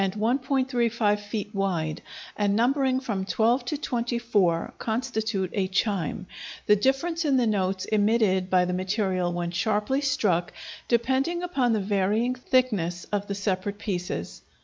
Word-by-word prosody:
35 235 0 +1
feet 205 0 -5
wide, 175 -6 -1 0.3
and 205 -1 +1
numbering 260 +3 +2
from 215 -7 -3
12 235 +5 +1
to 295 +4 -2
24, 235 - 0
constitute 220 -5 -2
a 195 -2 0
chime, 185 -2 -1 0.4
the 210 - +6
difference 270 - 0
in 280 -4 +2
the 245 - +3
notes 190 -3 0
emitted 205 -3 +2
by 180 -1 +4
the 180 - -2
material 185 -1 0
when 175 0 -3
sharply 210 +8 0
struck 190 -11 +1 0.4
depending 265 +9 +1
upon 265 -10 +1
the 220 - +1
varying 205 +5 +1
thickness 225 -10 0
of 205 -1 -1
the 200 - -3
separate 200 0 -2
pieces. 180 - -4
210 Hz, 135 wpm, -26 LUFS, 190-245 Hz, 0.4 s, the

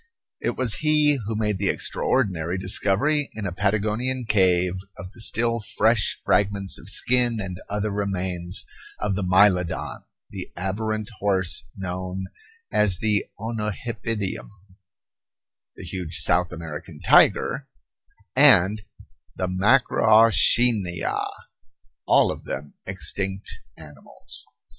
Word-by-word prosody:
It - - -3
was 125 -4 +1
he 150 -2 +4
who 110 - -3
made 105 -3 -1
the 100 -1 0
extraordinary 90 -8 -1
discovery 105 +10 +1
in 110 -2 -5
a 95 - -3
Patagonian 110 +6 -1
cave 90 -3 +2 0.2
of 90 0 -9
the 115 - -9
still 115 +2 +2 0.2
fresh 110 -1 +2
fragments 100 -1 0
of - - -10
skin 120 +1 +2
and 95 -2 -6
other 105 +1 -2
remains 95 -3 -3 0.3
of 105 -1 -1
the 100 - -2
mylodon, 90 -1 +2 0.3
the - - -8
aberrant 110 +4 -3
horse 95 -10 +1
known 95 0 -5 0.5
as 100 -4 +2
the 105 0 0
onohipidium, 110 -1 -4 1.3
the - - -11
huge 90 -1 -5
South 90 0 +2
American 80 -3 -8
tiger, - - +3 0.7
and 100 +5 +5 0.5
the 95 - -2
macrauchenia, 110 - +3 0.8
all - - +4
of - - -8
them 70 +2 -6
extinct 95 +1 -3 0.3
animals. 75 -6 -7
100 Hz, 110 wpm, -23 LUFS, 90-110 Hz, 1.3 s, and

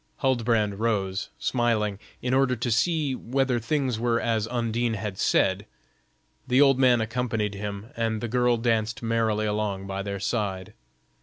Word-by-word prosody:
Huldbrand 115 -6 +1
rose, 105 -3 -1
smiling, 110 -5 0 0.2
in 125 0 0
order 130 -1 +3
to 120 +1 -2
see 150 +3 +1
whether 130 0 0
things 130 -1 -1
were 120 0 +1
as 115 -2 0
Undine 120 -1 -1
had 105 -2 -5
said; 95 +3 +2 0.8
the 125 +1 +3
old 135 -2 +5
man 125 -3 +5
accompanied 110 -2 -1
him, 100 +2 -6
and 115 -1 -1
the 120 - -3
girl 120 +1 +2
danced 115 +1 0
merrily 110 -2 +1
along 105 -2 -2
by 95 0 -4
their 100 0 -4
side. 100 -3 -2
115 Hz, 150 wpm, -26 LUFS, 105-125 Hz, 0.8 s, old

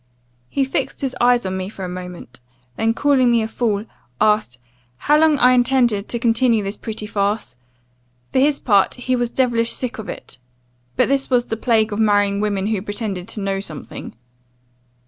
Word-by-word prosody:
He 275 - 0
fixed 270 0 -3
his 270 -2 -2
eyes 245 -2 +4
on 190 0 -2
me 190 0 -4
for 195 -3 -7
a - - -4
moment, 180 -9 -8 0.4
then, 225 +1 0
calling 270 -3 +3
me 235 -2 +3
a - - -2
fool, 220 -2 -1 0.3
asked 210 - +2 0.4
'How 295 - +3
long 315 -2 +4
I 250 -1 +5
intended 245 -4 +2
to 235 - -1
continue 230 -1 +2
this 200 +1 -4
pretty 215 -1 -6
farce? 205 - -2 0.8
For - - +3
his 285 +1 +2
part, 200 -5 +3
he 255 0 -1
was 240 -1 0
devilish 235 -3 +1
sick 250 -3 -3
of 220 - -7
it; - - -9 0.6
but - - +3
this 275 0 0
was 245 -2 +1
the 225 - -1
plague 225 -1 +1
of 205 - -3
marrying 205 -2 +2
women 200 -2 -1
who 210 -2 -1
pretended 205 -3 -4
to 210 - -3
know 195 0 -1
something. 155 - -8
225 Hz, 185 wpm, -20 LUFS, 200-250 Hz, 0.8 s, I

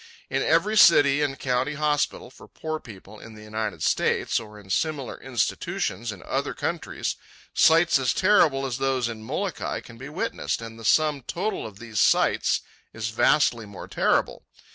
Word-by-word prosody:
In - - 0
every 215 +1 +2
city 145 -6 +6
and 140 -2 -1
county 130 +3 -1
hospital 150 -4 -1
for - - -15
poor 155 0 -5
people 105 -2 -13
in 110 -1 -12
the 105 - -12
United 110 0 -4
States, - - +1
or 105 -2 -11
in 95 -2 -11
similar 150 +1 -2
institutions 115 -3 -2
in 100 - -11
other - - -2
countries, - - -3 0.4
sights 165 -1 +5
as 130 -2 +1
terrible 160 -9 +3
as 130 -1 -3
those 135 -2 0
in 115 -2 -6
Molokai 110 - -3
can 115 - -14
be 130 +2 -8
witnessed, 75 - -2
and 115 0 -9
the 115 - -9
sum 150 +2 +3
total 190 - -3
of 100 -3 -13
these 110 -1 -5
sights - - +3 0.3
is 115 0 -3
vastly 115 -1 +2
more 100 - -9
terrible. - - 0
125 Hz, 165 wpm, -25 LUFS, 110-150 Hz, 0.4 s, city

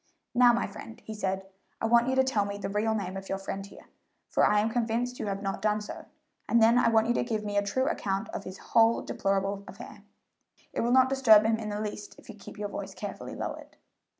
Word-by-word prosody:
"Now, 245 0 +6
my 235 0 0
friend," 225 +3 -10
he 220 - -6
said, 190 -2 -2 0.3
"I - - -1
want 235 +1 +4
you 260 - +1
to 265 - +4
tell 245 -6 +1
me 200 0 -4
the 200 - -4
real 215 +2 0
name 190 -3 -3
of 195 0 -7
your 195 - -1
friend 195 0 -5
here, 200 - -13 0.4
for - - +2
I 210 - +4
am 220 +2 +1
convinced 240 +1 -1
you - - -3
have 200 0 -3
not 195 0 -3
done 210 0 +1
so, 210 - -8 0.4
and 235 - +4
then 230 +2 +5
I 235 - +4
want 220 -1 +4
you 240 - +2
to - - 0
give 220 -3 -3
me 205 0 -3
a 205 - +4
true 260 +7 -1
account 195 -6 -1
of - - -5
this 185 0 -8
whole 230 0 +3
deplorable 195 0 -1
affair. 210 0 -11 0.7
It - - -1
will 235 - +1
not 260 0 +5
disturb 240 -6 +6
him 225 0 +2
in 215 -1 -5
the 205 0 -3
least 210 -1 -6
if - - -17
you - - -8
keep 210 - -12
your 205 0 -4
voice - - -6
carefully - - -7
lowered." - - -6
215 Hz, 245 wpm, -28 LUFS, 200-235 Hz, 0.7 s, Now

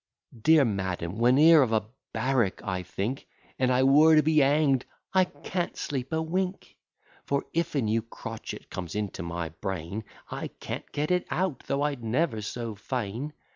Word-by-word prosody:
Dear 155 +2 +6
madam, 95 -3 -2
whene'er 145 +7 +7
of 125 -4 +2
a 110 -1 +2 0.3
barrack 125 -7 0
I 95 -3 -2
think, 100 +8 -4 0.3
An 130 -1 +3
I 130 +1 +3
were 150 +4 +7
to 155 - +6
be 155 +1 +4
hang'd, 140 -2 +3 0.3
I 185 -1 +5
can't 180 0 -4
sleep 135 -3 -3
a 160 - +1
wink: 185 +3 -3 0.5
For 140 0 0
if 170 -1 -1
a 140 - +2
new 110 +1 +1
crotchet 115 0 -8
comes 90 -1 -5
into 105 -5 -3
my 85 -1 -3
brain, 95 +4 -5 0.3
I - - -3
can't - - -6
get 150 +3 -1
it 180 0 +1
out, 180 -4 -1
though 140 +1 0
I'd 140 -5 -2
never 115 0 0
so 115 +2 -4
fain. 120 +5 -4
130 Hz, 170 wpm, -28 LUFS, 105-155 Hz, 0.5 s, whene'er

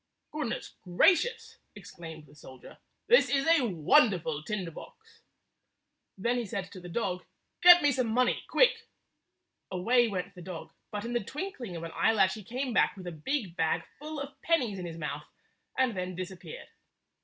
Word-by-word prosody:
" - - -53
"Goodness 300 -6 -4
gracious!" 385 - +2 0.2
exclaimed 165 -5 -10
the 145 - -19
soldier. 130 -3 -14 0.3
"This 485 - +5
is 275 -1 +1
a 325 -7 +4
wonderful 170 - +3
tinder 185 0 -4
box." - - -14 1.0
Then 235 +5 0
he 240 - -3
said 190 -1 -5
to 190 - -9
the 175 0 -10
dog, 180 -2 -2 0.4
"Get 355 -1 +9
me 290 - +5
some 255 -2 0
money, 250 +3 +1
quick! - - +3 0.4
" - - -53
Away 235 +7 +3
went 195 -2 -4
the 180 - -11
dog, 175 -1 -8 0.2
but 210 +1 -5
in 240 - -4
the 240 -3 0
twinkling 265 - -6
of 165 - -6
an 165 - -6
eyelash 200 -4 +3
he 215 - -8
came 250 +5 -3
back - - +2
with 185 - -9
a 175 - -4
big 180 - -3
bag 160 -2 0 0.2
full 305 +1 -6
of 280 0 -8
pennies 250 - +1
in 180 - -5
his 165 -1 -7
mouth, 150 -2 -5 0.5
and 255 -4 +2
then 180 0 -4
disappeared. 185 - -8
205 Hz, 180 wpm, -29 LUFS, 175-260 Hz, 1.0 s, Get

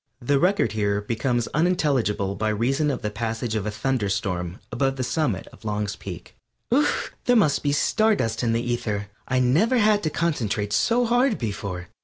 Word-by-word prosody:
(The 135 +2 +1
record 195 +5 +2
here 100 -2 0
becomes 115 +3 -1
unintelligible 135 - +1
by 110 +2 -1
reason 135 +8 +1
of 140 - -3
the 105 - -2
passage 115 +1 -3
of 105 -2 -1
a - - +1
thunderstorm 100 -6 -2
above 135 -1 0
the 130 - -2
summit 125 - -1
of - - -17
Long's 105 -1 -2
Peak.) - - -9 0.4
There 250 -2 +1
must 155 -11 +3
be 145 - +1
star 215 +9 +3
dust 115 - -1
in 120 -2 +1
the 115 +1 0
ether. 105 -4 -2 0.2
I 130 - 0
never 155 - +3
had 210 -2 +4
to 155 - 0
concentrate 115 -11 -1
so 240 - +3
hard 245 0 +2
before. 100 -5 -4
120 Hz, 175 wpm, -24 LUFS, 105-155 Hz, 0.4 s, had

